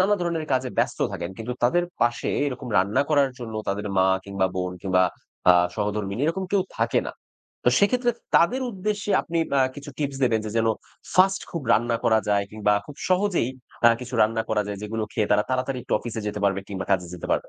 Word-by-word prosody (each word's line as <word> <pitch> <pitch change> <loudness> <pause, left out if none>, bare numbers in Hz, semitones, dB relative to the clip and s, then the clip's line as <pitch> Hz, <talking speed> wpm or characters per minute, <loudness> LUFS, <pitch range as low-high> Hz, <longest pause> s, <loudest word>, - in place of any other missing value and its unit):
নানা 200 +3 +4
ধরনের 170 -2 -1
কাজে 130 0 +1
ব্যস্ত - - +1
থাকেন। 85 +1 -4
কিন্তু 115 +2 -4
তাদের 175 +9 +3 0.2
পাশে 120 0 +1 0.2
এরকম 130 -2 -5
রান্না 100 +8 +2
করার 140 -3 +4
জন্য 115 -3 -7
তাদের 100 +1 -2
মা 95 - +5 0.2
কিংবা 100 -1 0
বোন 90 0 -2
কিংবা 95 -1 +3 0.5
আ - - +9 0.2
সহধর্মিনী 105 0 -2
এরকম 185 +4 -1
কেউ 200 -2 +4
থাকে - - +1
না। - - -5 0.5
তো - - +5
সেক্ষেত্রে 245 +4 +3 0.2
তাদের 245 +11 +4
উদ্দেশ্যে 205 0 -3
আপনি 165 0 -2 0.4
কিছু 145 +1 -9
আ - - -32
টিপস 140 -2 -2
দেবেন? 115 -3 +2
যে 110 - -4
যেন 115 - +2 0.5
ফার্স্ট 195 +1 +4
খুব 170 - -4
রান্না 115 +1 +2
করা 110 -1 +4
যায় 100 -1 +2
কিংবা 105 -1 +1
খুব 145 - -10
সহজেই 185 - +2 0.4
আ - - +10
কিছু 125 0 -7
রান্না 115 +1 +1
করা 105 -1 +1
যায় 100 -1 -5
যেগুলো 110 +1 -3
খেয়ে 105 -3 -1
তারা 105 0 +4
তাড়াতাড়ি 130 +1 -1
একটু - - -6
অফিসে 115 -2 -5
যেতে 105 0 -3
পারবে 100 -1 +2
কিংবা 95 -1 -4
কাজে 95 -2 +2
যেতে 90 - -7
পারবে? - - 0
120 Hz, 205 wpm, -24 LUFS, 105-165 Hz, 0.5 s, আ